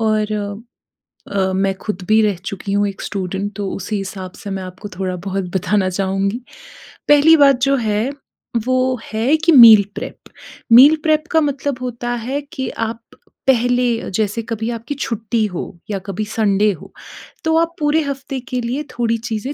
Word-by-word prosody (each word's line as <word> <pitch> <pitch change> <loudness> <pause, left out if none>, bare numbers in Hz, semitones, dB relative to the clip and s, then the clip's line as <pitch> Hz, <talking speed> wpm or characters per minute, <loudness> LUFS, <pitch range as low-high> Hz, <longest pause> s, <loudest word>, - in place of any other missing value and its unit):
और 215 -1 +1 1.0
अ, 190 -1 0
मैं 195 +1 +1
खुद 205 -3 -4
भी 220 +1 +5
रह 210 -2 +2
चुकी 195 0 -5
हूँ 205 0 +2
एक 200 0 -7
स्टूडेंट 195 +1 -3
तो 200 -1 -3
उसी 205 +2 -3
हिसाब 190 -1 -6
से 205 - -9
मैं 195 -1 -4
आपको 185 +3 -9
थोड़ा-बहुत 190 +1 -3
बताना 190 +1 +1
चाहूँगी। 195 +3 -1 0.7
पहली 295 +2 +7
बात 275 -3 +5
जो 275 +1 +3
है 220 0 0 0.6
वो 255 0 +1 0.2
है 235 +8 +2
कि 335 +2 +2
मील 230 -7 +9
प्रेप, - - -6 0.6
मील 275 +6 +9
प्रेप 310 0 +2
का 320 - +4
मतलब 285 -2 -1
होता 240 -1 -4 0.2
है 275 +3 -2
कि 260 -3 -3
आप 225 +1 -4 0.5
पहले 245 -1 +2
अ, - - -6
जैसे 210 +3 -1
कभी 225 0 -2
आपकी 235 +5 -5
छुट्टी 230 -4 -1
हो 180 -5 -4 0.2
या 200 -2 -2
कभी 200 +2 -3
संडे 210 -1 +2
हो, 180 - -10 0.5
तो 320 -1 +1
आप 335 +1 +1
पूरे 300 +1 +2
हफ़्ते 275 -1 -4
के 250 -1 -1
लिए 250 +5 -3
थोड़ी 230 -1 +1
चीज़ें 230 +3 -4
225 Hz, 170 wpm, -18 LUFS, 200-260 Hz, 1.0 s, मील